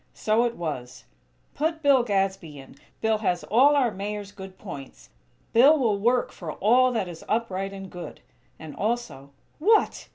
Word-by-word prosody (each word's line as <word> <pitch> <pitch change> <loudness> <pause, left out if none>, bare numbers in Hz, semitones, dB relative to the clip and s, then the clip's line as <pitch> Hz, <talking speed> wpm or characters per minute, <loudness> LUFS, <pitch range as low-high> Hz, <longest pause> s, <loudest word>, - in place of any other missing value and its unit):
So 220 +2 +1
it 235 0 -2
was: 135 -7 -6 0.5
"Put 320 +2 -2
Bill 280 -3 +5
Gadsby 195 -8 -2
in!! 135 -1 -13 0.3
Bill 220 -1 +1
has 180 -5 -1
all 270 +7 +4
our 255 -5 +2
Mayor's 205 +1 -5
good 190 -2 -11
points! 135 - -10 0.4
Bill 275 +7 +6
will 220 -7 +1
work 240 +4 +1
for 165 -4 -7
all 250 +5 +3
that 220 -5 -1
is 170 -2 -9
upright 195 -4 -1
and 195 -1 -8
good!" 180 -2 -9 0.4
And 155 -2 -10
also: 220 - -3 0.3
"_What! 430 +5 +2
210 Hz, 160 wpm, -25 LUFS, 180-240 Hz, 0.5 s, Bill